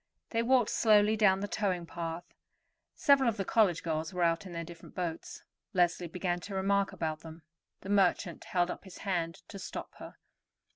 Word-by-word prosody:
They 230 Hz, -, +1 dB
walked 245 Hz, -1 st, +3 dB
slowly 215 Hz, -1 st, +4 dB
down 195 Hz, -3 st, +4 dB
the 205 Hz, -, -2 dB
towing 185 Hz, -5 st, -1 dB
path. 165 Hz, 0 st, -5 dB, 0.7 s
Several 275 Hz, -3 st, +4 dB
of 225 Hz, -, -3 dB
the 195 Hz, -, -2 dB
college 195 Hz, -7 st, +3 dB
girls 160 Hz, +1 st, -2 dB
were 180 Hz, -, +1 dB
out 165 Hz, +1 st, +1 dB
in -, -, -9 dB
their 170 Hz, 0 st, -4 dB
different 170 Hz, 0 st, -12 dB
boats. 170 Hz, -3 st, -4 dB, 0.3 s
Leslie 175 Hz, -1 st, +2 dB
began 175 Hz, +1 st, -2 dB
to 195 Hz, +2 st, -7 dB
remark 195 Hz, +1 st, +1 dB
about 155 Hz, -1 st, -3 dB
them. 160 Hz, 0 st, -11 dB, 0.4 s
The 195 Hz, -, -8 dB
merchant 195 Hz, -3 st, +2 dB
held 180 Hz, -1 st, +1 dB
up -, -, -8 dB
his 190 Hz, -2 st, -12 dB
hand 170 Hz, -4 st, -2 dB
to 200 Hz, -, -9 dB
stop -, -, -7 dB
her. -, -, -11 dB
180 Hz, 185 wpm, -31 LUFS, 170-205 Hz, 0.7 s, slowly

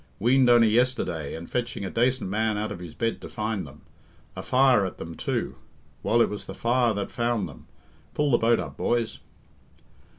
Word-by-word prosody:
Weaned 125 Hz, +3 st, +4 dB
only 120 Hz, -2 st, +6 dB
yesterday, 110 Hz, -, 0 dB
and 80 Hz, +1 st, -8 dB
fetching 120 Hz, -4 st, -3 dB
a -, -, -4 dB
dacent 125 Hz, +1 st, +1 dB
man 110 Hz, +2 st, 0 dB
out 105 Hz, +1 st, -2 dB
of -, -, -6 dB
his 85 Hz, -3 st, -9 dB
bed 115 Hz, 0 st, -2 dB
to -, -, -8 dB
find 110 Hz, -6 st, -3 dB
them. 75 Hz, +2 st, -15 dB, 0.5 s
A -, -, -5 dB
fire 130 Hz, -4 st, +4 dB
at 95 Hz, -, -4 dB
them, 85 Hz, 0 st, -7 dB
too! -, -, -3 dB, 0.4 s
Well, 115 Hz, +1 st, +3 dB
it -, -, +1 dB
was 105 Hz, -, -6 dB
the -, -, -7 dB
fire 120 Hz, 0 st, +2 dB
that 100 Hz, -1 st, -3 dB
found 120 Hz, -5 st, -1 dB
them. 70 Hz, -6 st, -14 dB, 0.5 s
Pull 150 Hz, -1 st, +1 dB
the 120 Hz, -, +4 dB
boat 115 Hz, +1 st, +3 dB
up, -, -, -6 dB
boys." 120 Hz, -2 st, -1 dB
115 Hz, 195 wpm, -26 LUFS, 100-120 Hz, 0.5 s, only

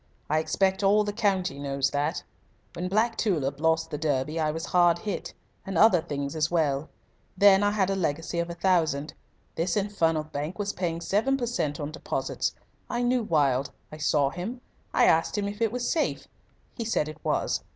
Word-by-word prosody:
I 155 Hz, -, +3 dB
expect 190 Hz, +5 st, +1 dB
all 205 Hz, +2 st, +4 dB
the 205 Hz, 0 st, -3 dB
county 190 Hz, -9 st, 0 dB
knows 140 Hz, -1 st, -1 dB
that. 145 Hz, +4 st, -1 dB, 0.5 s
When 180 Hz, +1 st, -3 dB
Black 215 Hz, +5 st, +1 dB
Tulip 145 Hz, -, 0 dB
lost 160 Hz, 0 st, +1 dB
the 150 Hz, -, -3 dB
Derby 150 Hz, +1 st, -1 dB
I 155 Hz, -1 st, +1 dB
was 160 Hz, +1 st, -3 dB
hard 175 Hz, -1 st, +4 dB
hit. 205 Hz, +3 st, -5 dB, 0.3 s
And 195 Hz, -3 st, -4 dB
other 190 Hz, -3 st, +6 dB
things 140 Hz, -3 st, -4 dB
as 155 Hz, 0 st, +1 dB
well. 155 Hz, -3 st, 0 dB, 0.5 s
Then 200 Hz, 0 st, +7 dB
I 205 Hz, -, +3 dB
had 200 Hz, -2 st, +1 dB
a -, -, 0 dB
legacy 165 Hz, -1 st, -2 dB
of 170 Hz, 0 st, -1 dB
a 170 Hz, -, -5 dB
thousand. 165 Hz, -5 st, +1 dB, 0.4 s
This 175 Hz, +6 st, -1 dB
infernal 165 Hz, -6 st, +1 dB
bank 150 Hz, +2 st, -5 dB
was 205 Hz, -1 st, -2 dB
paying 170 Hz, -2 st, -2 dB
7 225 Hz, +10 st, +1 dB
per 245 Hz, -, -2 dB
cent. 155 Hz, -11 st, -2 dB
on 145 Hz, 0 st, -4 dB
deposits. 160 Hz, -, -3 dB, 0.3 s
I 240 Hz, 0 st, -1 dB
knew 245 Hz, 0 st, +2 dB
Wilde. 140 Hz, -, +1 dB, 0.2 s
I 155 Hz, -, -8 dB
saw 145 Hz, -2 st, +2 dB
him. 215 Hz, -, -5 dB, 0.3 s
I -, -, +4 dB
asked 165 Hz, +5 st, +3 dB
him 200 Hz, -1 st, 0 dB
if 205 Hz, +2 st, -6 dB
it 225 Hz, -2 st, +2 dB
was 245 Hz, 0 st, -2 dB
safe. 320 Hz, -, -1 dB, 0.5 s
He 235 Hz, -, -4 dB
said 220 Hz, -9 st, 0 dB
it 155 Hz, -, -10 dB
was. -, -, 0 dB
170 Hz, 195 wpm, -27 LUFS, 150-205 Hz, 0.5 s, Then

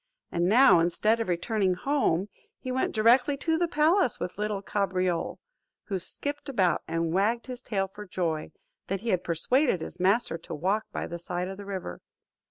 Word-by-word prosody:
And 175 Hz, +1 st, +1 dB
now, 240 Hz, -4 st, +7 dB
instead 210 Hz, +7 st, +2 dB
of 225 Hz, -, -2 dB
returning 185 Hz, +1 st, 0 dB
home, 205 Hz, -, +1 dB, 0.3 s
he 255 Hz, -, -5 dB
went 260 Hz, +1 st, 0 dB
directly 245 Hz, +6 st, +4 dB
to 325 Hz, +3 st, 0 dB
the 345 Hz, +1 st, +1 dB
palace 320 Hz, -, +3 dB
with 180 Hz, -, -5 dB
little 210 Hz, -2 st, -2 dB
Cabriole, 185 Hz, -4 st, -1 dB, 0.5 s
who 195 Hz, -3 st, -3 dB
skipped 290 Hz, -, -5 dB
about, 190 Hz, -9 st, +2 dB
and 165 Hz, 0 st, -1 dB
wagged 220 Hz, +5 st, +1 dB
his 250 Hz, -1 st, -7 dB
tail 195 Hz, -5 st, -1 dB
for 210 Hz, +2 st, -11 dB
joy, 165 Hz, -4 st, -2 dB, 0.4 s
that 195 Hz, 0 st, -2 dB
he 235 Hz, -, -3 dB
had 185 Hz, -4 st, +1 dB
persuaded 245 Hz, -, +1 dB
his 180 Hz, -, -7 dB
master 195 Hz, -1 st, +2 dB
to 165 Hz, -, -7 dB
walk 195 Hz, +8 st, 0 dB
by -, -, -3 dB
the 170 Hz, -, -6 dB
side 175 Hz, +1 st, -3 dB
of 190 Hz, 0 st, -6 dB
the 200 Hz, -, -9 dB
river. 190 Hz, -, -6 dB
200 Hz, 180 wpm, -28 LUFS, 180-245 Hz, 0.5 s, now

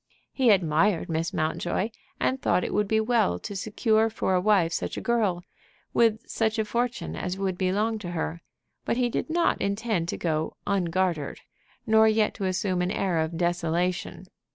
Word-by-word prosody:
He 260 Hz, -3 st, +2 dB
admired 175 Hz, -1 st, +3 dB
Miss 165 Hz, +2 st, -1 dB
Mountjoy, 175 Hz, +4 st, -1 dB, 0.3 s
and 260 Hz, 0 st, 0 dB
thought 180 Hz, -, +2 dB
it -, -, -3 dB
would 210 Hz, 0 st, +1 dB
be 220 Hz, +1 st, +2 dB
well 220 Hz, -, +2 dB
to 200 Hz, -, -7 dB
secure 220 Hz, +2 st, +1 dB
for 215 Hz, -3 st, -1 dB
a 180 Hz, -, +3 dB
wife 185 Hz, -5 st, +3 dB
such -, -, -3 dB
a -, -, -1 dB
girl, 210 Hz, -7 st, 0 dB, 0.5 s
with 225 Hz, -1 st, +2 dB
such 220 Hz, -1 st, 0 dB
a 220 Hz, -, +1 dB
fortune 240 Hz, +3 st, -2 dB
as 180 Hz, +1 st, -3 dB
would 195 Hz, -2 st, -1 dB
belong 205 Hz, +5 st, 0 dB
to 180 Hz, -4 st, -6 dB
her. 165 Hz, 0 st, -3 dB, 0.4 s
But -, -, -1 dB
he 245 Hz, -1 st, +2 dB
did 240 Hz, -, -3 dB
not 340 Hz, +1 st, +1 dB
intend 200 Hz, -3 st, -1 dB
to -, -, -3 dB
go 160 Hz, -2 st, -2 dB
"ungartered," 180 Hz, -5 st, -1 dB, 0.4 s
nor 220 Hz, 0 st, +5 dB
yet 215 Hz, -1 st, +2 dB
to 195 Hz, -, -4 dB
assume 185 Hz, -1 st, 0 dB
an 180 Hz, -, 0 dB
air 185 Hz, -3 st, 0 dB
of 160 Hz, +1 st, -2 dB
"desolation." 175 Hz, +1 st, -1 dB
195 Hz, 175 wpm, -26 LUFS, 175-220 Hz, 0.5 s, nor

